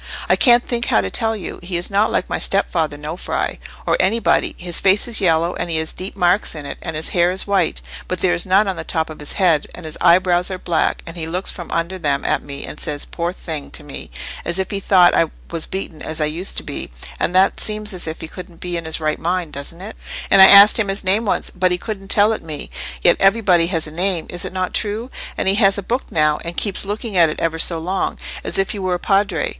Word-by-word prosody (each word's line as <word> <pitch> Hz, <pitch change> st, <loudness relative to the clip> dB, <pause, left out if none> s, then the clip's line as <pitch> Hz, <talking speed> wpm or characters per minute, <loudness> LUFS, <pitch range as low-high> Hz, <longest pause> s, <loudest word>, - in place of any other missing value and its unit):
"I -, -, +4 dB
can't 240 Hz, -1 st, +5 dB
think 240 Hz, -1 st, -1 dB
how 105 Hz, -, +3 dB
to 95 Hz, -1 st, -4 dB
tell 225 Hz, 0 st, 0 dB
you: 195 Hz, -5 st, -7 dB
he 175 Hz, 0 st, -3 dB
is 175 Hz, +3 st, 0 dB
not 205 Hz, +2 st, +2 dB
like -, -, 0 dB
my -, -, -2 dB
stepfather 160 Hz, -6 st, 0 dB
Nofri, 155 Hz, +4 st, -4 dB, 0.3 s
or -, -, +2 dB
anybody. 225 Hz, +4 st, +2 dB
His 175 Hz, -1 st, -3 dB
face 195 Hz, +3 st, +3 dB
is 230 Hz, -3 st, +4 dB
yellow, 170 Hz, -1 st, +2 dB
and -, -, -4 dB
he 165 Hz, -, 0 dB
has 160 Hz, 0 st, -1 dB
deep 185 Hz, +2 st, -6 dB
marks 180 Hz, 0 st, +1 dB
in 150 Hz, -2 st, -7 dB
it; -, -, -7 dB
and 160 Hz, -2 st, -5 dB
his 155 Hz, -, -2 dB
hair 175 Hz, 0 st, +2 dB
is 185 Hz, +1 st, -2 dB
white, 195 Hz, -5 st, 0 dB, 0.3 s
but 185 Hz, -, -3 dB
there 180 Hz, -2 st, +2 dB
is 175 Hz, -, +1 dB
none 195 Hz, +3 st, +3 dB
on 190 Hz, -, -1 dB
the -, -, -5 dB
top 160 Hz, -2 st, -2 dB
of 155 Hz, -, -10 dB
his 150 Hz, -, -4 dB
head: 170 Hz, -7 st, +2 dB
and 180 Hz, -, -10 dB
his 155 Hz, -, -7 dB
eyebrows 180 Hz, +1 st, +4 dB
are 185 Hz, -, -4 dB
black, 170 Hz, -2 st, -1 dB
and 165 Hz, +1 st, -9 dB
he 160 Hz, -1 st, -4 dB
looks 180 Hz, +3 st, -1 dB
from 175 Hz, -, -9 dB
under 170 Hz, +3 st, -2 dB
them 145 Hz, -4 st, -1 dB
at -, -, +1 dB
me, 140 Hz, -1 st, -7 dB
and 150 Hz, -, -8 dB
says, 145 Hz, -1 st, -3 dB
'Poor 170 Hz, 0 st, -3 dB
thing!' 160 Hz, -5 st, -6 dB
to -, -, -5 dB
me, -, -, -8 dB, 0.3 s
as 170 Hz, +2 st, -1 dB
if 190 Hz, -1 st, -2 dB
he 200 Hz, -, -1 dB
thought 185 Hz, -2 st, +5 dB
I 165 Hz, -, +3 dB, 0.2 s
was 165 Hz, -2 st, -1 dB
beaten 185 Hz, -4 st, -6 dB
as 155 Hz, 0 st, -3 dB
I 155 Hz, -, +2 dB
used 165 Hz, +5 st, -3 dB
to -, -, -2 dB
be; -, -, -6 dB, 0.3 s
and 180 Hz, -, -1 dB
that 190 Hz, +1 st, +4 dB
seems 215 Hz, -1 st, 0 dB
as 180 Hz, -2 st, -3 dB
if 160 Hz, -, -5 dB
he -, -, -6 dB
couldn't 175 Hz, 0 st, -11 dB
be 175 Hz, -1 st, -3 dB
in 165 Hz, -, -6 dB
his 160 Hz, 0 st, -2 dB
right 155 Hz, -1 st, -1 dB
mind, 175 Hz, -1 st, -2 dB
doesn't 140 Hz, +5 st, -7 dB
it? 210 Hz, +3 st, -8 dB, 0.4 s
And 195 Hz, -, +7 dB
I 190 Hz, -, +11 dB
asked 200 Hz, +3 st, +9 dB
him 215 Hz, -, +1 dB
his 195 Hz, +2 st, 0 dB
name 200 Hz, +4 st, +2 dB
once, 200 Hz, -, -1 dB
but 185 Hz, 0 st, +1 dB
he 180 Hz, -, +1 dB
couldn't 195 Hz, 0 st, -6 dB
tell 205 Hz, +2 st, +4 dB
it -, -, -4 dB
me: 155 Hz, -3 st, -6 dB, 0.3 s
yet 175 Hz, -, +5 dB
everybody 195 Hz, -4 st, +4 dB
has 165 Hz, -3 st, -1 dB
a 155 Hz, -, -6 dB
name—is 175 Hz, 0 st, -2 dB
it -, -, -5 dB
not 185 Hz, 0 st, -3 dB
true? 220 Hz, +4 st, -2 dB, 0.3 s
And -, -, -1 dB
he 195 Hz, -, +3 dB
has 195 Hz, +1 st, +4 dB
a 200 Hz, -, -4 dB
book 245 Hz, +7 st, -2 dB
now, 150 Hz, -1 st, +2 dB
and 170 Hz, +1 st, -5 dB
keeps 200 Hz, -2 st, +2 dB
looking 210 Hz, +1 st, -4 dB
at 165 Hz, -2 st, +6 dB
it 155 Hz, -, -5 dB
ever 165 Hz, 0 st, -1 dB
so 165 Hz, 0 st, 0 dB
long, 185 Hz, +4 st, -2 dB, 0.3 s
as -, -, -2 dB
if 195 Hz, 0 st, +1 dB
he 205 Hz, -, -5 dB
were 185 Hz, -1 st, 0 dB
a -, -, -4 dB
Padre. 195 Hz, -4 st, +1 dB
180 Hz, 260 wpm, -19 LUFS, 165-195 Hz, 0.4 s, I